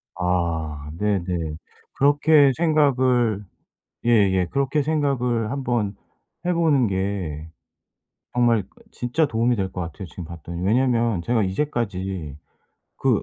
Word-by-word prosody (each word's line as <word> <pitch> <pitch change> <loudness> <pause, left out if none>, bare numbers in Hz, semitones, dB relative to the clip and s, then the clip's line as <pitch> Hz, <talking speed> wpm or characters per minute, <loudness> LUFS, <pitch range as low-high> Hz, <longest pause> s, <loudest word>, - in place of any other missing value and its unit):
아. 85 -5 -1
네네. 90 -6 -1 0.4
그렇게 145 0 +5
생각을 130 - +2 0.6
예예 100 -6 +3
그렇게 140 +2 +1
생각을 135 -7 0
한번 120 -7 -1 0.5
해 180 - +2
보는 155 -7 +3
게 95 -6 -3 0.9
정말 120 -3 +3 0.3
진짜 125 +6 0
도움이 120 -1 +1
될 95 -3 -2
것 90 - -4
같아요 85 +3 -7
지금 85 0 -8
봤더니. 85 +1 -7
왜냐면 115 -3 +2
제가 115 +4 +1
이제까지 95 - -2 0.6
그 - - +1
110 Hz, 225 characters per minute, -23 LUFS, 90-130 Hz, 0.9 s, 그렇게